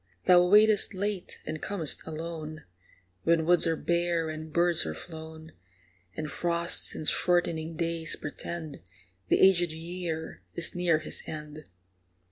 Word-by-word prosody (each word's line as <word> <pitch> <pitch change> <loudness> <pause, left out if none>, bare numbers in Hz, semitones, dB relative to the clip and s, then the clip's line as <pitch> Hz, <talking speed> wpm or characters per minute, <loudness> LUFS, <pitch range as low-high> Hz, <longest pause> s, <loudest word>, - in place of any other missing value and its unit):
Thou 180 -1 +7
waitest 210 +1 +5
late 200 -1 -3
and 155 0 -5
com'st 175 -7 -2
alone, 160 -1 -6 0.6
When 165 - +2
woods 175 0 +4
are 165 - +2
bare 170 -1 0
and 155 0 -7
birds 170 +1 +3
are 80 -1 -4
flown, 160 - -9 0.7
And 155 - -3
frosts 170 +2 -1
and 155 - -3
shortening 165 -2 +1
days 165 -1 -2
portend 155 0 -6 0.5
The - - +3
aged 175 -3 +5
year 165 0 -5
is 170 - +4
near 175 -2 +2
his 155 - -4
end. 150 -1 -7
165 Hz, 130 wpm, -28 LUFS, 155-175 Hz, 0.7 s, Thou